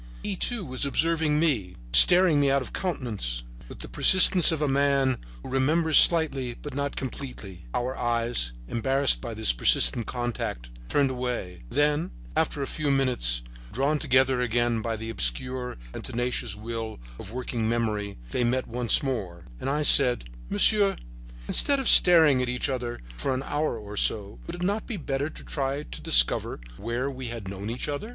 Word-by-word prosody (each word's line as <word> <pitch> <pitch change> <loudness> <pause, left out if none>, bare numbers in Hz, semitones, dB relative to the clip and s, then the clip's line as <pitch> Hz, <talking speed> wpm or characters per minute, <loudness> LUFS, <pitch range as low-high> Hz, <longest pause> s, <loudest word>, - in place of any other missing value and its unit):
He, 205 - -3
too, 225 +1 0
was 130 -1 -4
observing 155 +1 +1
me, 120 - -1 0.2
staring 175 -4 +7
me 140 -1 +2
out 135 -1 +1
of - - -11
countenance, 110 - -3 0.3
with - - -9
the - - -7
persistence 185 -2 +7
of 160 - -2
a 150 - 0
man 135 -2 +1 0.2
who - - -9
remembers 155 +5 +3
slightly 140 -7 +2
but 145 +2 -10
not 140 +1 -3
completely. 120 - -8
Our 125 +2 -2
eyes, 115 - -1 0.2
embarrassed 135 - 0
by 120 -3 -7
this 110 - +3
persistent - - +3
contact, 120 - -5 0.2
turned 140 -2 +1
away; 120 - -5
then, 150 +1 0 0.3
after 150 -3 -1
a - - -2
few 150 +1 -3
minutes, 125 - 0 0.3
drawn 140 +5 -1
together 130 -2 +2
again 120 -1 0
by 115 0 -3
the 115 +1 -7
obscure 125 - -3 0.2
and - - -8
tenacious 120 -3 -3
will 110 - -6 0.2
of 100 - -10
working 120 -2 -3
memory, 105 -3 -2
they 125 - -1
met 125 +2 0
once 120 +2 +1
more, 95 -11 -5
and - - -4
I 150 +2 -1
said: 125 - +4 0.2
"Monsieur, 200 - +3 0.5
instead 280 -1 +1
of 265 - -2
staring 160 -7 +6
at 125 - -2
each 125 +2 -2
other 120 -2 -5 0.2
for 130 - -2
an 130 - -4
hour 145 -4 -2
or 105 -1 -10
so, 105 0 0
would 170 - -6
it 175 - -7
not 205 +4 -2
be 225 - -5
better 140 -2 -3
to - - -12
try 140 0 -3
to - - -10
discover - - +3 0.2
where 120 +5 -3
we 130 -2 -6
have 115 -4 -7
known 100 +2 -6
each 120 +5 -4
other?" 145 +10 -5
130 Hz, 175 wpm, -25 LUFS, 115-145 Hz, 0.5 s, staring